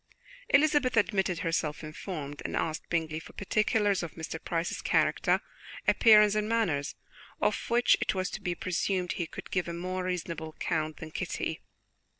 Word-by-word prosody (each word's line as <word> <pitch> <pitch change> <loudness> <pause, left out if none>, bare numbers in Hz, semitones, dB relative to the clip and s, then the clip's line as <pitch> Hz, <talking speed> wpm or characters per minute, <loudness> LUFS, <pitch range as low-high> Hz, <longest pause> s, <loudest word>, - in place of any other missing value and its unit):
Elizabeth 285 -4 +4
admitted 195 -4 +2
herself 160 -2 -1
informed, 155 -2 -6
and - - -3
asked 155 -1 -2
Bingley 160 -2 -1
for - - -13
particulars 205 0 +1
of 170 - -6
Mr. 160 0 -6
Price's 165 0 -2
character, - - +2 0.5
appearance 210 -2 +7
and 215 0 0
manners, 175 -12 0 0.4
of - - 0
which 240 +1 +5
it - - 0
was 185 0 -1
to - - -5
be 180 -2 -2
presumed 185 0 -1
he 170 - -2
could - - -9
give 180 -2 0
a 170 - -4
more 185 +2 -3
reasonable 170 -3 -3
account 155 0 -2
than 160 -1 -8
Kitty. - - -3
180 Hz, 160 wpm, -29 LUFS, 160-210 Hz, 0.5 s, appearance